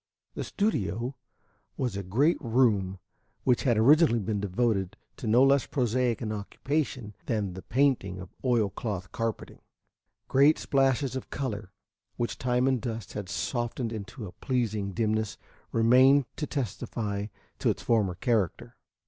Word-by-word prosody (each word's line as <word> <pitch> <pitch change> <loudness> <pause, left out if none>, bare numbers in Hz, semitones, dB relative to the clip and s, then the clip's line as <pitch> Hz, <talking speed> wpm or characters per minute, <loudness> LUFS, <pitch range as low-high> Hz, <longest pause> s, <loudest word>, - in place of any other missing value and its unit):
The - - -4
studio 125 - -1 0.6
was 125 -6 -1
a 100 - -2
great 125 - +2
room 110 -7 +2 0.5
which 125 0 +2
had 120 -4 +3
originally 140 +3 +5
been 105 -1 -1
devoted 100 0 0 0.2
to 130 - -5
no 120 +4 +5
less 135 0 +4
prosaic 125 -2 0
an 110 - -2
occupation 120 +2 -3
than 105 -6 -1
the 95 - -8
painting 120 -8 +1
of 90 -1 -10
oil 115 -6 +2
cloth 95 -5 -4
carpeting, 115 -1 -4 0.7
great 140 +4 +5
splashes 135 -1 +1
of 130 - -5
color, 105 -8 -4 0.4
which 120 -1 -3
time 125 0 +1
and 130 -3 +1
dust 110 -4 -5
had 100 -3 -5
softened 120 0 -2
into 110 +2 -7
a 90 - -8
pleasing 110 -6 -1
dimness, 110 +1 -1 0.3
remaining 130 +4 +5
to 150 - -3
testify 105 -6 -3 0.3
to - - +2
its - - -2
former 105 -6 +2
character. 105 -3 -1
115 Hz, 140 wpm, -28 LUFS, 105-130 Hz, 0.7 s, originally